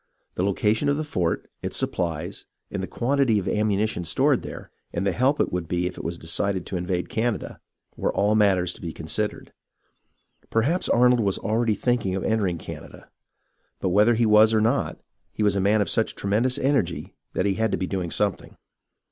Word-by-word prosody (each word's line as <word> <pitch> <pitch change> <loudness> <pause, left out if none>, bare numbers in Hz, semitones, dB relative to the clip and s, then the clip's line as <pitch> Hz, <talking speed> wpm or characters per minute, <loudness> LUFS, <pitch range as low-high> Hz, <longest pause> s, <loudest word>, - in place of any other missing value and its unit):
The - - -3
location 105 +7 +1
of 145 - +1
the 155 - -1
fort, 90 - -1
its - - -2
supplies, 85 +1 -2 0.2
and - - -3
the - - -4
quantity 130 -2 +1
of 95 - -1
ammuni 105 0 +1
tion 90 -5 -4
stored 85 - +2
there, - - -9 0.2
and 85 +3 -2
the 100 - +2
help 130 +9 +1
it - - +1
would 90 -2 -2
be 90 +1 -1
if 90 - -3
it - - -8
was 85 +1 -3
decided 90 +3 -1
to - - -5
invade 90 0 -2
Canada, 115 -1 -2 0.4
were - - -1
all 105 +1 +2
matters 95 -5 +3
to - - -12
be 85 -2 -5
considered. 85 +7 -3 1.0
Per 115 - +2
haps 165 +10 0
Arnold 125 0 +5
was 100 -4 +1
already 110 0 0
thinking 110 -4 0
of 95 - -3
entering 100 -6 0
Canada; - - -10 0.7
but 95 - 0
whether 105 +6 +4
he 115 +1 +2
was 110 +1 +6
or - - +4
not, 115 +6 0 0.3
he 110 - -1
was 100 -2 +3
a 100 - +1
man 105 +2 +3
of 100 - 0
such 110 - 0
tremendous 115 +7 0
energy 135 -12 0 0.2
that 95 - 0
he 100 - +2
had 110 +1 0
to - - 0
be 95 - -2
doing 90 -2 -3
something. 100 +1 -1
105 Hz, 200 wpm, -24 LUFS, 90-115 Hz, 1.0 s, was